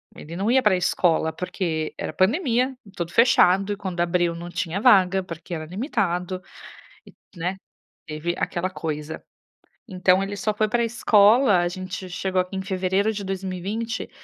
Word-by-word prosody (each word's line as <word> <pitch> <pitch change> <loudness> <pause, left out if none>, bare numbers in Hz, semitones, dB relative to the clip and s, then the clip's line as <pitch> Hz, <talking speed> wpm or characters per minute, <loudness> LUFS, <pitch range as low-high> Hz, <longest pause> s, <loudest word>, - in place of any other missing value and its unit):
ele 165 +3 -9
não 200 +6 0
ia 265 0 +4
para 210 -3 +4
escola 165 -2 +1
porque 170 -4 -3
era - - -4
pandemia, 250 - +1 0.2
tudo 170 0 -4
fechado, 205 -4 +4
e - - -7
quando 185 -3 -5
abriu 175 -1 +1
não 170 +1 -7
tinha 175 +2 -3
vaga 195 -5 +5
porque 170 0 -8
era 155 -1 -4
limitado, 185 - -2 0.9
né, 180 +3 -3 0.5
teve 160 +3 -3
aquela 180 +2 -2
coisa. 155 -3 -5 0.7
Então 185 0 +3
ele 200 +1 -4
só 215 +2 -1
foi 215 0 +1
para 235 +2 +1
escola, 220 -1 +4
a 175 - +1
gente 185 +1 -6
chegou 185 +1 -1
em 190 - -3
fevereiro 190 +2 0
de 205 -1 -5
2020, 195 +5 -4
185 Hz, 150 wpm, -23 LUFS, 175-205 Hz, 0.9 s, vaga